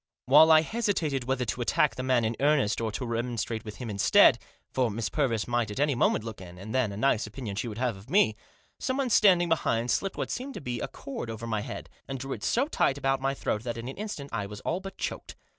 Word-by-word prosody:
While 155 +5 +7
I 155 0 +8
hesitated 160 - -1
whether 130 -1 0
to 120 +2 -3
attack 135 +4 +2
the 130 - -5
man 130 -3 +2
in 110 +1 -1
earnest 140 -7 +2
or 110 -1 -1
to 125 - -3
remonstrate 115 -1 -2
with 105 -1 -8
him 125 - -7
instead 100 -2 +5 0.2
— - - -40
for 125 -3 +2
Miss 110 0 -3
Purvis 120 -8 0
might 120 -2 0
at 105 - -5
any 145 0 +3
moment 120 -3 +2
look 110 -4 -7
in, 90 -1 -11
and 105 +5 -8
then 130 -5 +1
a 100 - -7
nice 110 -2 +2
opinion 110 -2 -6
she 115 - -2
would 110 -2 -6
have 125 -2 0
of 95 +2 -14
me 180 - +4 0.2
— - - -37
someone 260 -1 -1
standing 180 -5 +5
behind 120 -7 +1
slipped 195 -1 -1
what - - -3
seemed 265 +2 -5
to - - -5
be 125 -3 -4
a - - -3
cord 135 -4 -7
over 115 +1 -6
my 110 -2 -1
head, - - -7 0.2
and 135 - -4
drew 135 +1 -4
it - - -8
so 255 +4 +2
tight 140 - +1
about 135 -1 0
my 135 +1 0
throat 105 - -2
that 120 0 -4
in 115 +1 -6
an 130 - -7
instant 195 -9 -6
I 105 -3 -2
was 105 0 -8
all 175 - -1
but 195 0 -9
choked. - - -5
125 Hz, 260 wpm, -28 LUFS, 110-145 Hz, 0.2 s, I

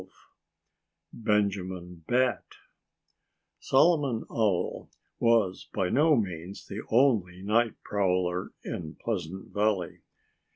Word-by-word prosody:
XII - - -15 1.0
Benjamin 95 -5 -1
Bat 125 -3 +2 1.2
Solomon 140 -5 +3
Owl 105 -6 0 0.3
was 115 -6 +2
by 95 -3 +1
no 150 - +4
means 95 -4 -4
the 105 +2 -6
only 110 -8 +2
night 115 +2 +2
prowler 90 -2 0
in 80 -1 -5
Pleasant 95 -4 -5
Valley. 105 -4 0
100 Hz, 90 wpm, -28 LUFS, 90-115 Hz, 1.2 s, no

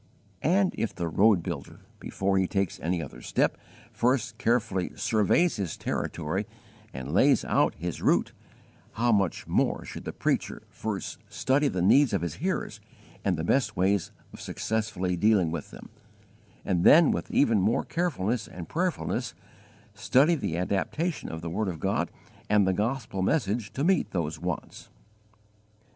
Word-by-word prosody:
And 185 +5 +2
if 115 - -2
the 85 -2 -2
road 95 +2 +4
builder, 80 -6 -6 0.2
before 95 0 0
he 95 - +1
takes 95 -2 -1
any 85 +1 -1
other 65 -4 -10
step, - - +1 0.4
first 120 0 0
carefully 110 -6 0
surveys 115 - +2
his 95 -6 -3
territory 85 +6 -3 0.4
and 65 -1 -6
lays - - +4
out - - +2
his 85 +3 -5
route, - - +2 0.6
how 120 +2 +1
much 100 -6 +1
more - - 0
should - - -8
the - - -3
preacher - - -2
first - - -5
study 140 +3 +1
the 95 -9 -1
needs 135 +7 +5
of - - 0
his 85 -4 -4
hearers - - -2 0.4
and 95 -4 +1
the 80 - -3
best 115 +3 +1
ways 95 0 +1 0.2
of - - -10
successfully 105 -5 -2
dealing 95 -3 +3
with 85 -3 -5
them, - - -12 0.8
and 90 -2 +1
then 160 -1 +7
with - - -3
even 115 -8 +3
more 105 +5 +2
carefulness 125 - -1
and 90 -2 -9
prayerfulness 180 +1 -2 0.6
study 145 +7 +3
the 85 - -2
adaptation 150 - -2
of 80 0 -6
the 85 - -4
word 105 +4 -1
of 85 -4 -4
God 95 -2 0 0.4
and 105 -2 +4
the 95 - +3
gospel 110 -1 -2
message 105 -1 0
to 140 - -2
meet 185 0 +2
those 80 -4 -3
wants. 90 -3 -5
100 Hz, 155 wpm, -27 LUFS, 90-120 Hz, 0.8 s, then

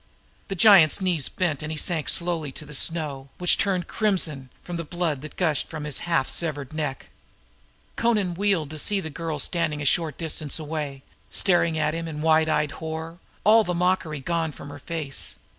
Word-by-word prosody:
The 195 - -3
giant's 190 -5 +7
knees 180 -7 +1
bent 170 -7 -1
and 155 +1 -4
he 155 - -4
sank 165 -2 0
slowly 170 -4 -1
into 145 +3 -7
the 150 - -10
snow 145 -2 -1
which 180 -1 +4
turned 185 -3 +1
crimson 165 - 0 0.2
with 175 -1 -4
the 170 - -3
blood 165 -4 -2
that 155 - -9
gushed 160 -5 0
from 155 -2 -6
his 150 -2 -3
half 165 -6 +2
severed 145 -4 -1
neck. 150 -4 -4 0.9
Amra 215 -6 +2
wheeled, 180 -5 0
to 155 - -5
see 205 +6 +1
the 160 -4 -5
girl 160 +1 -3
standing 155 -1 0
a 145 - -4
short 155 0 +2
distance 155 -3 -2
away, 150 -3 -4 0.3
staring 175 -3 +2
in 155 0 -2
wide 160 0 +4
eyed 150 -1 +1
horror, 160 +1 -6 0.2
all 220 +2 +6
mockery 175 -4 0
gone 165 +1 -1
from 140 - -10
her 145 0 -9
face. 140 - -3
160 Hz, 175 wpm, -25 LUFS, 150-175 Hz, 0.9 s, giant's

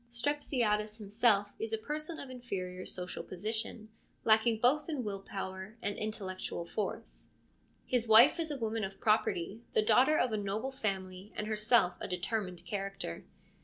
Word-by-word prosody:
Strep 285 +5 0
siades 215 -6 0
himself 205 -1 +2
is 225 0 -3
a 225 - +1
person 305 +7 -4
of 270 - -7
inferior 185 -7 -5
social 180 -1 -3
position, 220 +3 -4 0.3
lacking 220 0 +4
both 290 +7 +3
in 290 -6 -2
will 200 -2 -3
power 195 +2 -6
and 205 -3 -2
intellectual 190 -5 -4
force; 215 +5 -5 0.6
his 245 -2 0
wife 230 +9 +8
is 325 -1 0
a 290 - -2
woman 225 -2 -2
of 195 0 -5
property, 215 -1 +1
the 215 - +4
daughter 255 +8 +5
of 250 - +2
a 215 - 0
noble 210 +6 -2
family 190 -4 -3
and 210 - -2
herself 215 -3 +2
of - - -3
determined 180 -1 -2
character. 195 - -4
215 Hz, 160 wpm, -32 LUFS, 195-240 Hz, 0.6 s, wife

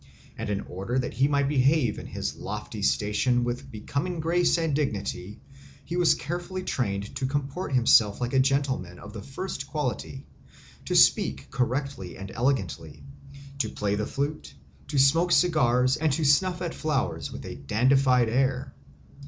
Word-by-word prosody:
And - - -5
in 100 -1 -1
order 95 +8 -4
that 125 - -1
he 135 +2 +3
might 140 -1 +1
behave 135 -3 +2
in - - -8
his - - -4
lofty - - -6
station 105 - +1
with 125 +3 -4
becoming 145 +10 -3
grace 175 +2 +2
and 165 -3 0
dignity 105 -7 -3 0.5
he 170 - -4
was 175 -2 +4
carefully 175 +3 -5
trained 100 - -2
to 135 -1 -1
comport 145 +3 -3
himself 115 -4 +5
like 120 +1 -2
a 135 - +4
gentleman 130 -10 0
of 105 +3 -11
the 110 - -7
first 140 - -6
quality, 135 -2 -4 0.6
to - - -1
speak 70 - +3
correctly 125 - -2
and 95 0 -8
elegantly, 100 - -2 0.6
to 110 -5 0
play 100 -1 -2
the 105 +1 -1
flute, 145 +2 -4 0.3
to 145 0 -3
smoke 165 +6 +4
cigars 130 -7 +3
and 155 -1 +1
to 155 +2 0
snuff 180 +6 +3
at 170 - -3
flowers 155 -4 -2
with - - -8
a - - -6
dandified 125 - +3
air. 130 +2 0
135 Hz, 160 wpm, -26 LUFS, 110-150 Hz, 0.6 s, himself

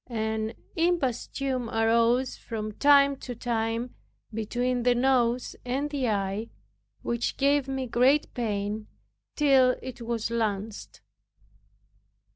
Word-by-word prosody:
An 220 -1 -2 0.2
imposthume 270 -6 -1
arose 230 +3 +2
from 215 -2 -5
time 280 +3 +5
to 250 -2 -7
time 230 +1 -2 0.4
between 245 +3 -1
the 245 0 +3
nose 245 -1 +1
and 275 +4 -2
the 270 -5 0
eye, 200 +2 -2 0.5
which 235 0 -2
gave 280 0 +2
me 265 -1 -2
great 255 +5 +2
pain 210 -2 -2 0.5
till 265 -4 +4
it 255 -2 -7
was 230 -1 -2
lanced. 215 -2 -3
240 Hz, 105 wpm, -27 LUFS, 225-265 Hz, 0.5 s, time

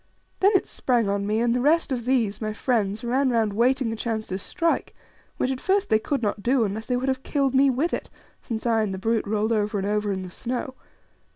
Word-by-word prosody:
Then 395 +2 +4
it - - +3
sprang 240 -4 0
on 200 0 -1
me, 215 +1 +1
and 235 0 +2
the 250 - +1
rest 305 +2 +2
of 240 -3 -2
these, 230 -6 +1
my 215 -1 -2
friends, 215 -3 -1
ran 260 +3 +1
round 225 -4 +1
waiting 245 +1 +2
a - - -3
chance 220 -1 -3
to 185 - -3
strike, 330 - -1 0.4
which 260 - 0
at 260 - -4
first 395 +1 +1
they 220 - +4
could 270 +3 -2
not 205 0 -1
do 250 +2 +2
unless 215 +2 -3
they 250 - +1
would 260 +2 -2
have 265 -1 0
killed 275 -2 0
me 270 +1 +5
with 275 +7 0
it, - - -3 0.3
since 225 -2 -5
I 225 -2 +3
and 200 -3 -1
the - - -6
brute 225 +2 0
rolled 215 +1 0
over 210 -1 0
and 195 - -2
over 210 0 0
in 190 -1 -3
the 180 - -8
snow. 250 +6 -4
230 Hz, 245 wpm, -25 LUFS, 210-260 Hz, 0.4 s, me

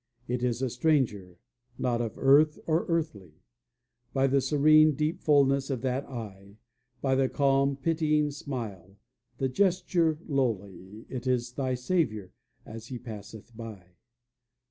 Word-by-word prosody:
It 125 0 -2
is 125 +1 -1
a 130 - 0
stranger, 120 - 0 0.4
not 120 -1 0
of 115 -2 -4
earth 150 +3 +5
or 160 +1 0
earthly; 150 - -2 0.8
By 135 0 +2
the 135 0 +3
serene, 155 +2 +5
deep 155 +3 -1
fullness 140 -2 +3
of 130 -4 -2
that 130 +1 -1
eye, 100 -5 -9 0.5
By 135 -1 +2
the 130 0 +2
calm, 140 0 +2
pitying 150 0 +1
smile, 105 - -7 0.4
the 135 - 0
gesture 170 +1 +1
lowly, 105 - -3
It 130 -1 -6
is 125 -1 0
thy 130 -1 -1
Saviour 125 - -1 0.3
as 115 +1 -9
He 125 - -6
passeth 110 -1 -10
by. 105 -6 -10
130 Hz, 135 wpm, -28 LUFS, 110-145 Hz, 0.8 s, earth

